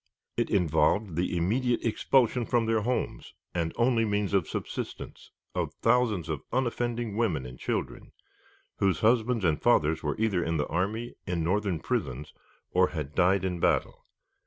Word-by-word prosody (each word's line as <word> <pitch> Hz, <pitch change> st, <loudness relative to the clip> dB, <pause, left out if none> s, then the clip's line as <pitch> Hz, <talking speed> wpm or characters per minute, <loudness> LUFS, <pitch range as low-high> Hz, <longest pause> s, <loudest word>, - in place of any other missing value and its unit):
It -, -, 0 dB
involved 85 Hz, +2 st, +2 dB
the 90 Hz, +1 st, 0 dB
immediate 120 Hz, +9 st, +1 dB
expulsion 120 Hz, +1 st, +2 dB
from 120 Hz, -2 st, +2 dB
their 110 Hz, -1 st, +1 dB
homes 125 Hz, +3 st, -3 dB, 0.2 s
and 85 Hz, -2 st, -1 dB
only 120 Hz, -1 st, +3 dB
means 105 Hz, -2 st, 0 dB
of 95 Hz, -5 st, +2 dB
subsistence -, -, -6 dB, 0.2 s
of -, -, -2 dB
thousands 115 Hz, -7 st, +2 dB
of -, -, -3 dB
unoffending 120 Hz, -3 st, -1 dB
women 90 Hz, -, 0 dB
and 60 Hz, 0 st, -10 dB
children, -, -, -3 dB, 0.7 s
whose 95 Hz, -5 st, +1 dB
husbands 115 Hz, -1 st, +2 dB
and 80 Hz, -3 st, +1 dB
fathers 80 Hz, +2 st, +3 dB
were 75 Hz, -, -2 dB
either 105 Hz, -6 st, +1 dB
in 80 Hz, 0 st, -1 dB
the 75 Hz, -, 0 dB
army, 105 Hz, +7 st, -2 dB
in 90 Hz, -3 st, -1 dB
Northern 95 Hz, 0 st, 0 dB
prisons, 75 Hz, -, -3 dB, 0.4 s
or 90 Hz, 0 st, +4 dB
had 75 Hz, -5 st, -5 dB
died 95 Hz, +2 st, +3 dB
in 90 Hz, -2 st, -2 dB
battle. -, -, 0 dB
100 Hz, 155 wpm, -28 LUFS, 85-115 Hz, 0.7 s, or